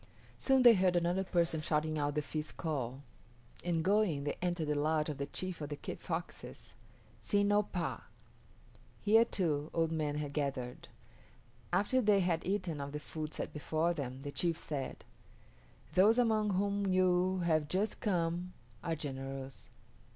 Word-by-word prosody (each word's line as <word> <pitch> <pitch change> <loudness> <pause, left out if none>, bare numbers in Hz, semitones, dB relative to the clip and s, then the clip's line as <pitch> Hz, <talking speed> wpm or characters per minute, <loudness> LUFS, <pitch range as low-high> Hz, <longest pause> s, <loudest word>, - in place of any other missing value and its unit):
Soon 265 -1 +4
they 240 -1 +10
heard 185 -3 +3
another 175 +2 +2
person 170 -4 0
shouting 155 0 0
out 145 0 0
the 150 - 0
feast 155 +1 -5
call, 135 -4 -3 0.6
and, 170 -2 0
going, 190 -6 +2
they 145 - -2
entered 175 -3 -1
the - - +3
lodge 155 +1 +1
of 145 - -5
the 140 - -2
chief 185 +1 -4
of 145 - -4
the 145 - -3
Kit - - -7
Foxes 175 -1 -6 0.5
(S[)i]n´ 205 -1 +2
o 205 - +5
pah). 170 - -3 1.0
Here, 220 +2 +5
too, 155 -8 -1
old 165 -1 +2
men 155 -2 -1
had 145 -1 -3
gathered. 135 -4 -3 0.8
After 255 +6 +2
they 205 -3 +4
had 170 -2 +1
eaten 185 -6 -1
of 140 0 -5
the 150 - -3
food 155 +1 -5
set - - -4
before 160 +3 0
them, 135 -4 -5
the 145 - -4
chief 170 +2 0
said, 145 -5 -5 0.9
"Those 210 +5 +5
among 215 -4 +2
whom 200 +1 0
you 185 0 +3
have 155 -3 +2
just 195 +7 -1
come 175 -2 -1 0.3
are 165 - -1
generous. 135 -2 -6
165 Hz, 160 wpm, -33 LUFS, 150-185 Hz, 1.0 s, they